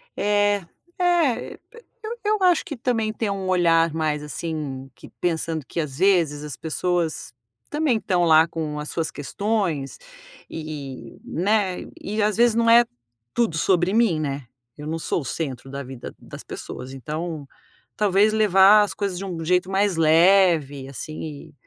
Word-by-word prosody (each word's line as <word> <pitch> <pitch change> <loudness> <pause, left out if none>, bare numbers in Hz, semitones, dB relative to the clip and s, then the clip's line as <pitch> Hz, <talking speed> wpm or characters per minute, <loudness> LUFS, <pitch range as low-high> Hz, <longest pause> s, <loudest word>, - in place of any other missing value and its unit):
É, 205 0 +2 0.4
eh, 345 -8 +1 0.5
eu 455 +2 -5
p 425 -3 -3
eu 425 -2 +1
acho 355 -3 +4
que 290 - -6
também 225 -3 0
tem 220 -1 -2
um 195 -1 -3
olhar 165 -3 +3
mais, 155 -2 -1
assim, 150 -4 -5
que - - -14
pensando 165 -3 -1
que 170 - -5
às 150 -4 -3
vezes 170 -6 +2
as 150 -5 -6
pessoas 165 -4 -2 0.4
também 295 -6 +1
estão 180 -4 0
lá 160 -1 +6
com 155 -2 -4
as 150 - -5
suas 165 -2 -2
questões 175 -3 -2 0.5
e, 150 -4 -7
né, 195 +1 0 0.2
e 215 +2 -3
às 210 0 +1
vezes 235 -1 +4
não 230 0 +3
é 235 +1 +7 0.5
tudo 225 -9 +1
sobre 180 +2 +2
mim, 220 -9 +3
né? 140 -4 -4 0.3
Eu 150 - -8
não 165 +1 -3
sou 165 - -1
o 135 - -9
centro 135 -2 -4
da 140 0 -5
vida 130 -1 -9
das - - -11
pessoas, 130 +1 -8
então 155 +2 -5 0.5
talvez 205 +1 +3
levar 210 0 +6
as 205 - -3
coisas 200 -3 -3
de 195 - -5
um 170 -3 -5
jeito 180 +3 +1
mais 195 -1 +2
leve, 165 -4 +4
assim, 150 +2 -7
175 Hz, 160 wpm, -23 LUFS, 155-205 Hz, 0.5 s, é